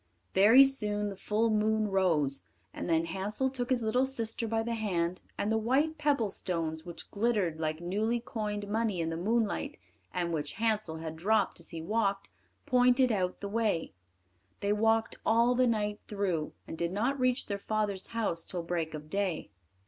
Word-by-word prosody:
Very 225 Hz, +8 st, +8 dB
soon 210 Hz, -6 st, 0 dB
the 200 Hz, -, -6 dB
full 215 Hz, +4 st, 0 dB
moon 215 Hz, 0 st, +2 dB
rose, 165 Hz, -8 st, +2 dB, 0.3 s
and -, -, -5 dB
then 165 Hz, 0 st, +2 dB
Hansel 205 Hz, +9 st, -1 dB
took 250 Hz, -2 st, -3 dB
his 250 Hz, -3 st, +1 dB
little 250 Hz, +4 st, +2 dB
sister 230 Hz, -3 st, -1 dB
by 225 Hz, 0 st, 0 dB
the 235 Hz, +1 st, -2 dB
hand, 185 Hz, -5 st, -1 dB, 0.2 s
and 210 Hz, -, 0 dB
the 220 Hz, -, +2 dB
white 285 Hz, +8 st, +1 dB
pebble 285 Hz, -9 st, +1 dB
stones, 160 Hz, -4 st, -2 dB
which 170 Hz, -1 st, -9 dB
glittered 205 Hz, -7 st, 0 dB
like 155 Hz, 0 st, -1 dB
newly 215 Hz, +7 st, 0 dB
coined 210 Hz, -3 st, -4 dB
money 215 Hz, -3 st, 0 dB
in 165 Hz, 0 st, -1 dB
the -, -, -2 dB
moonlight, 215 Hz, +5 st, 0 dB, 0.3 s
and 175 Hz, -1 st, -2 dB
which 145 Hz, -2 st, -2 dB
Hansel 215 Hz, -7 st, 0 dB
had 160 Hz, 0 st, -6 dB
dropped 205 Hz, +5 st, +1 dB
as -, -, -4 dB
he 165 Hz, -2 st, -6 dB
walked, 200 Hz, 0 st, 0 dB, 0.4 s
pointed 250 Hz, 0 st, +4 dB
out 185 Hz, -4 st, -1 dB
the 200 Hz, -, -3 dB
way. 210 Hz, -, 0 dB, 0.7 s
They 200 Hz, +1 st, +2 dB
walked 225 Hz, +1 st, +2 dB
all 235 Hz, +2 st, +4 dB
the 250 Hz, 0 st, +3 dB
night 210 Hz, -2 st, 0 dB
through, 190 Hz, -7 st, -1 dB
and 160 Hz, -, -7 dB
did 170 Hz, 0 st, 0 dB
not 240 Hz, +8 st, 0 dB
reach 255 Hz, 0 st, +2 dB
their 200 Hz, -1 st, -3 dB
father's 205 Hz, -2 st, -1 dB
house 210 Hz, -8 st, -1 dB
till 175 Hz, -2 st, -5 dB
break 165 Hz, -2 st, -2 dB
of 150 Hz, 0 st, -8 dB
day. 185 Hz, -, -2 dB
210 Hz, 180 wpm, -30 LUFS, 175-230 Hz, 0.7 s, Very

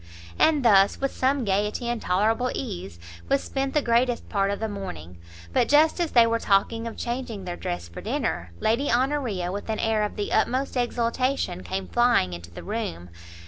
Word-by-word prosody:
And 300 Hz, -5 st, +4 dB
thus, 200 Hz, -3 st, +5 dB
with 275 Hz, 0 st, -1 dB
some 265 Hz, -1 st, +1 dB
gaiety, 210 Hz, +4 st, 0 dB
and 240 Hz, -2 st, -2 dB
tolerable 220 Hz, +7 st, +1 dB
ease, 185 Hz, -, -5 dB, 0.3 s
was 275 Hz, 0 st, +2 dB
spent 270 Hz, +1 st, -3 dB
the 300 Hz, -, +3 dB
greatest 240 Hz, +1 st, +1 dB
part 195 Hz, -2 st, +1 dB
of 200 Hz, -, -2 dB
the 220 Hz, -, -1 dB
morning; 90 Hz, -, -7 dB, 0.3 s
but -, -, +2 dB
just 310 Hz, +4 st, +4 dB
as 340 Hz, -2 st, +1 dB
they 235 Hz, -2 st, +7 dB
were 230 Hz, 0 st, +1 dB
talking 225 Hz, +3 st, +1 dB
of 230 Hz, -, -7 dB
changing 240 Hz, -5 st, -4 dB
their 175 Hz, -1 st, -4 dB
dress 85 Hz, -, -4 dB
for 85 Hz, -, -9 dB
dinner, 85 Hz, +1 st, -2 dB
Lady 235 Hz, +6 st, +1 dB
Honoria 245 Hz, -8 st, 0 dB
with 205 Hz, +3 st, -6 dB
an 220 Hz, -, -1 dB
air 220 Hz, -1 st, +1 dB
of 210 Hz, -, -2 dB
the 205 Hz, -1 st, -3 dB
utmost 255 Hz, +5 st, +1 dB
exultation, 240 Hz, -5 st, 0 dB
came 190 Hz, 0 st, -4 dB
flying 240 Hz, -, +2 dB
into 85 Hz, 0 st, -8 dB
the 85 Hz, -, -10 dB
room. 90 Hz, -, -4 dB
225 Hz, 185 wpm, -25 LUFS, 195-250 Hz, 0.3 s, they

